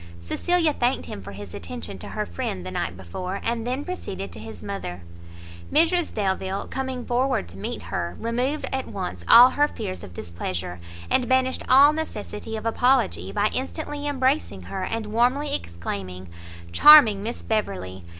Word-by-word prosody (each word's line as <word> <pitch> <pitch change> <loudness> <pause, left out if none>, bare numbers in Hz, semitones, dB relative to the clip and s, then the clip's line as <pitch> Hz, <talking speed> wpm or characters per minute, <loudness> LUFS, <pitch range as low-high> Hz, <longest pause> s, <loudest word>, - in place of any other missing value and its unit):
Cecilia 325 - +1
thanked 245 0 0
him 100 - -7
for 100 - -9
his 100 -2 -9
attention 85 +2 -6
to - - -8
her - - -3
friend 90 +1 -4
the 90 - -5
night 90 -1 -3
before, 180 - -5
and 230 0 -1
then 260 +4 -2
proceeded 360 - -5
to - - -9
his 110 -1 -9
mother. 90 - -5 0.7
Mrs 335 +1 +3
Delvile, 190 -1 -2
coming 260 -2 -4
forward 250 - 0
to 90 - -12
meet 95 - -5
her, 85 0 -4
removed 250 +6 -1
at 265 0 -2
once 90 -1 -5
all 245 +2 +10
her 290 +2 +3
fears 200 -9 -6
of 90 - -10
displeasure, 85 +1 -5 0.3
and 250 -1 +2
banished 260 0 +2
all 280 +3 +8
necessity 220 -7 -5
of 215 - -7
apology, 160 - +2
by 210 - +1
instantly 290 +2 -3
embracing 260 - 0
her, 190 - -5
and 225 +1 -3
warmly 245 +7 +1
exclaiming 90 +1 -5 0.4
"Charming 230 - +8
Miss 230 +4 -5
Beverley! 95 - -2
210 Hz, 160 wpm, -24 LUFS, -, 0.7 s, all